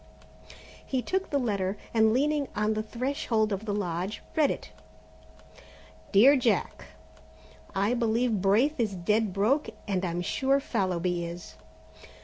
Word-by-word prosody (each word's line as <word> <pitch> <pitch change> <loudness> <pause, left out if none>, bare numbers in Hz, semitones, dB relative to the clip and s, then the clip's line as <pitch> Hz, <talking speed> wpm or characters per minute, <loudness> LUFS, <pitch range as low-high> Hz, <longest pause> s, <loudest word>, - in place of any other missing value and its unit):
He 260 -2 -2
took 380 0 -2
the 285 - +1
letter, 200 -6 -1 0.2
and 220 -1 +4
leaning 285 +3 +1
on 210 +1 +1
the 215 - -1
threshold 230 -2 -1
of 195 +3 -4
the 210 - -2
lodge, 190 0 -3
read 300 -3 +4
it: - - -5 1.4
"Dear 245 +8 +7
Jack, 245 -4 0 0.9
"I 200 +4 +1
believe 230 -2 +1
Braith 235 +10 +2
is 215 -4 0
dead 210 +4 +1
broke 220 +10 +1 0.2
and 190 -2 -1
I'm 175 -1 -2
sure 270 +8 +1
Fallowby 180 -7 -1
is. 170 0 -8
215 Hz, 130 wpm, -28 LUFS, 195-255 Hz, 1.4 s, Dear